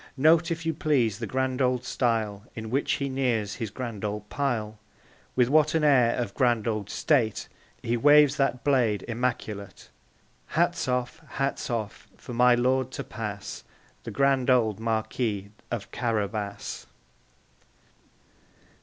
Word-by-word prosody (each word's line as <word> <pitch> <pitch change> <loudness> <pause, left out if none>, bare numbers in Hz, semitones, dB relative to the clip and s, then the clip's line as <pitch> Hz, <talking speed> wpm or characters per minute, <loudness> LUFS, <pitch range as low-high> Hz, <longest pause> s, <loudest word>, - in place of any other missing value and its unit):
Note, 160 +5 +4
if 165 -1 -3
you 165 - +1
please, 125 -9 +1
the 115 - -4
grand 130 +2 -1
old 125 -1 +1
style 110 -6 -1
In 110 -1 -6
which 140 +3 +1
he 140 - -1
nears 120 -6 -1
his 115 - -3
grand 115 -2 -6
old 105 0 -3
pile; 110 -6 -2 0.6
With 125 -2 +4
what 155 +3 +3
an 160 - +2
air 125 -6 +4
of 120 -5 -3
grand 120 -3 +1
old 105 -3 -2
state 120 -9 +1 0.4
He 115 - 0
waves 145 +3 +6
that 130 -3 0
blade 120 -8 +2
immaculate! 110 -5 -4 0.6
Hats 175 -2 0
off, 125 +2 -2
hats 135 0 -2
off, 115 -4 -4
for - - -9
my 125 +1 +5
lord 130 +1 +1
to 140 - -4
pass, 105 -5 -6 0.4
The - - -6
grand 135 -2 +2
old 110 -5 +3
Marquis 110 -2 -2 0.2
of 120 -4 -5
Carabas! 105 -3 -3
120 Hz, 140 wpm, -27 LUFS, 110-135 Hz, 0.6 s, waves